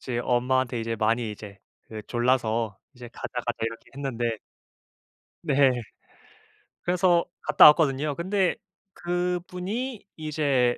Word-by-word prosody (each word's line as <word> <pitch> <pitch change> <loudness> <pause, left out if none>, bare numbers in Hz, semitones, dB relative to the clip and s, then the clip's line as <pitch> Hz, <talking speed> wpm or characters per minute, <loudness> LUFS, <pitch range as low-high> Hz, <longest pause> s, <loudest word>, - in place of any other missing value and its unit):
이제 125 -2 -3
엄마한테 125 0 +1
이제 115 0 -3
많이 115 +1 0
이제 105 -1 -10 0.3
그 110 -1 -7
졸라서 115 -4 0 0.2
이제 120 -1 -10
"가자, - - -6 0.2
가자" 120 0 -3
이렇게 115 0 -5
했는데 120 -5 -2 1.1
네. 140 -4 +4 1.1
그래서 175 -1 +3 0.2
갔다 150 -1 +6
왔거든요. 150 -1 +3
근데 190 +2 0 0.4
그분이 180 +7 -3
이제 145 -6 +1
130 Hz, 250 characters per minute, -26 LUFS, 120-170 Hz, 1.1 s, 갔다